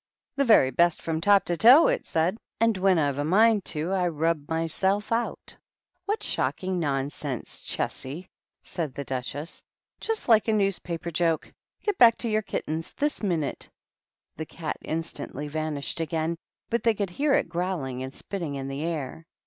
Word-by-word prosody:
"The 280 - +2
very 215 - +6
best, 170 +5 +3
from 160 -1 -2
top 200 +1 +5
to 175 - 0
toe," 250 - +8
it - - 0
said. 170 +7 0 0.2
"And 230 -1 +3
when 190 -1 +3
I've 145 -3 +1
a - - +1
mind 210 +5 +4
to 160 +3 -2
I 185 -2 +1
rub 160 -2 -1
myself 190 +6 0
out." 230 +1 -2 0.3
" 360 0 -52
What 420 +2 -1
shocking 185 -1 -1
nonsense, 140 -3 -3
Chessy 155 +8 -4 0.2
!" - - -60
said 155 -7 -3
the 140 - -4
Duchess; 135 +4 -5 0.4
"just 450 -1 -3
like 225 -2 +5
a 220 - +3
newspaper 175 -4 -1
joke. 165 -1 0 0.3
Get 415 -3 -1
back 230 -1 +7
to 235 - -3
your 215 0 +2
kittens 165 -5 -4
this 295 0 -1
minute." 170 -8 -2 0.7
The 160 - -4
Cat 160 -2 -5
instantly 160 -3 -4
vanished 155 0 -3
again, 165 +1 -1 0.4
but 235 - +1
they 230 -2 +3
could 200 -3 -2
hear 285 +8 +2
it - - +1
growling 170 -7 -3
and 130 0 -5
spitting 165 -1 -5
in 135 -1 -4
the 135 +1 -4
air. 160 -1 -4
170 Hz, 175 wpm, -26 LUFS, 155-205 Hz, 0.7 s, toe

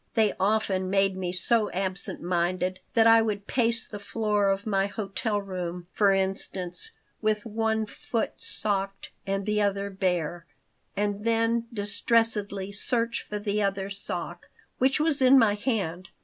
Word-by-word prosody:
They 220 -3 +3
often 195 -2 +1
made 195 0 +2
me 185 -2 -3
so 210 +4 +2
absent 190 -2 -1
minded 180 +1 0 0.2
that 225 -1 +5
I 225 0 +7
would 205 -2 -2
pace 230 -1 +1
the 205 - -7
floor 210 0 0
of 195 0 -1
my 195 -2 +1
hotel 210 +1 -2
room, 180 -3 -5
for 200 -2 +4
instance, 190 - -1 0.3
with 215 -1 0
one 220 0 0
foot 225 +2 -4
socked 195 -1 -1 0.2
and 195 0 -1
the 210 0 +1
other 200 0 0
bare, 175 -3 -1 0.5
and 205 0 -1
then 230 +1 +1
distressedly 205 -2 0
search 230 +3 -1
for 210 - -5
the 205 0 -1
other 195 0 -1
sock, 200 0 -6 0.3
which 265 +3 +3
was 300 -2 +2
in 260 +1 +7
my 225 -5 +5
hand. 195 -6 -2
205 Hz, 150 wpm, -27 LUFS, 195-225 Hz, 0.5 s, I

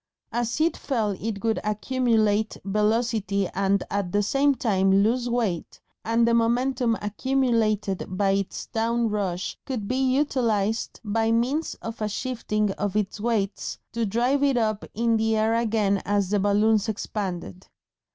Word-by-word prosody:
As 240 +2 -1
it 325 +2 +2
fell 225 -7 -1
it 200 +1 -4
would 225 -1 +1
accumulate 220 -1 +1
velocity 210 -1 +1
and 195 0 +1
at 200 -3 -1
the 205 +2 +2
same 280 +6 +2
time 195 -8 +2
lose 240 +3 +1
weight, 225 -8 -2 0.2
and 230 +1 +2
the 235 - +3
momentum 235 0 +2
accumulated 215 -4 0
by 195 +1 +1
its 195 -1 -2
down 230 +1 0
rush 190 -4 -2
could 240 -7 -4
be 255 - -1
utilised 255 -6 0
by 225 +1 0
means 255 +8 0
of 225 -1 -6
a 210 - 0
shifting 215 -3 -1
of 205 0 -1
its 210 0 -1
weights 215 -3 -1
to 230 0 -2
drive 245 +7 +1
it 275 -3 +3
up 215 -3 0
in 230 +1 +2
the 220 0 +1
air 220 +1 +2
again 215 -4 +1
as 200 -2 0
the 205 - +2
balloons 210 +2 +2
expanded. 185 - -4
220 Hz, 150 wpm, -25 LUFS, 205-235 Hz, 0.2 s, the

